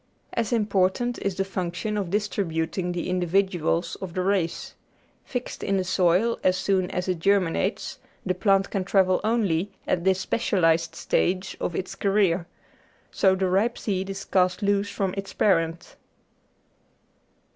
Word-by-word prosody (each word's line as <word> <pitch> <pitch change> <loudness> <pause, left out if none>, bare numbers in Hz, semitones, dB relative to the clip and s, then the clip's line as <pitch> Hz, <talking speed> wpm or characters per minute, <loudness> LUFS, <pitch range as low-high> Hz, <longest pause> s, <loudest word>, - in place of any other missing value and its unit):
As 230 -2 -1
important 215 +2 +1
is 200 -2 -1
the 195 0 -1
function 185 +2 -3
of 200 -4 -2
distributing 180 -3 -1
the 175 -1 -3
individuals 180 -2 0
of 185 -3 -6
the 185 - 0
race. 185 -4 -1 0.5
Fixed 250 -1 -5
in 195 -1 +1
the 190 - +1
soil 185 +5 +2
as 185 0 +3
soon 190 -1 +1
as 180 +1 -3
it 180 -2 -1
germinates, 190 -2 0 0.3
the 185 - +1
plant 195 +1 +2
can 195 -3 -1
travel 185 -1 +3
only 205 -5 0
at 170 - 0
this 190 0 +3
specialised 165 -6 +1
stage 185 +1 0
of 170 - -2
its 185 - -3
career. 195 -4 +1 0.6
So 190 -1 +3
the 190 0 0
ripe 205 +6 +1
seed 195 -2 -2
is 195 0 -5
cast 185 +2 +1
loose 200 0 +1
from 190 -2 -2
its 195 0 -5
parent. 165 -4 +1
190 Hz, 145 wpm, -25 LUFS, 180-200 Hz, 0.6 s, as